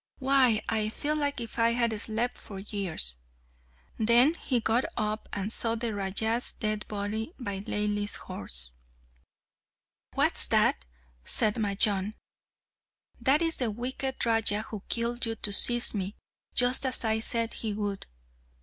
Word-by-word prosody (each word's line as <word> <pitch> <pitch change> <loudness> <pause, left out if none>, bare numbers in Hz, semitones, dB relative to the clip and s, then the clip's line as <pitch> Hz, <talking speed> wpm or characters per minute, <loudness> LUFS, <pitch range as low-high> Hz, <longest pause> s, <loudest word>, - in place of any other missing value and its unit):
Why, 260 -5 +3
I 215 -1 0
feel 300 +6 -2
as 285 -1 0
if 230 -1 -6
I 230 0 +3
had 235 -1 0
slept 230 +3 -2
for 200 - -10
years!" 190 - -3 0.8
Then 235 +7 +5
he 260 -7 -1
got 230 +3 +1
up 215 -1 -3
and 200 +1 -3
saw 230 -1 0
the 230 -1 -3
Raja's 215 +4 -1
dead 215 -1 -3
body 215 - -4
by 200 -6 -5
Laili's 205 0 -2
horse. - - +1 1.4
"What's - - +3
that?" 60 - +2 0.4
said 215 - +3
Majnun. 205 -1 +2 1.0
"That 290 +4 +3
is 330 0 0
the 245 -3 0
wicked 255 +4 -3
Raja 225 -2 +3
who 215 -2 -8
killed 235 +1 -1
you 225 - -2
to 205 -1 0
seize 240 +3 +5
me, 200 -1 -4 0.4
just 250 +2 +3
as 260 -3 0
I 220 0 +1
said 230 0 -1
he 220 - -3
would." 205 -1 -4
220 Hz, 140 wpm, -28 LUFS, 205-240 Hz, 1.4 s, Then